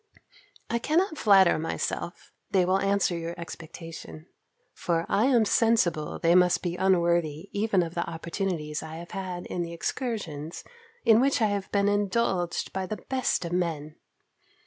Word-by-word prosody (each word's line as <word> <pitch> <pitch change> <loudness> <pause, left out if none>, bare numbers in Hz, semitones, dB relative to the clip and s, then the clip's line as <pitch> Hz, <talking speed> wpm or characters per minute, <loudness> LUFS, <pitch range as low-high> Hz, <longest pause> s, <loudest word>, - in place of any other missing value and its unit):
I 235 - -1
cannot 315 - +1
flatter 195 -6 +5
myself 165 +2 -4 0.2
they 185 -2 +3
will 185 +2 +2
answer 195 -2 +1
your 170 +1 -5
expectation; 165 -1 -9 0.5
for 170 -1 -1
I 215 - +2
am 240 -5 +4
sensible 205 -9 +2
they 170 0 +3
must 180 0 +4
be 175 -1 -2
unworthy 170 -3 +1
even 205 -3 +1
of 165 0 -6
the 170 - -2
opportunities 165 -2 -3
I 160 0 -8
have 170 +1 -9
had 185 -2 -5
in 175 - -3
the 170 0 -4
excursions, 170 - -4 0.4
in 225 0 +6
which 275 0 +2
I 220 -2 +3
have 200 -1 -3
been 200 0 +2
indulged 205 -3 0
by 190 -1 -2
the 215 - -4
best 260 -8 -1
of 170 - -5
men. 160 -4 -2
180 Hz, 155 wpm, -27 LUFS, 170-205 Hz, 0.5 s, in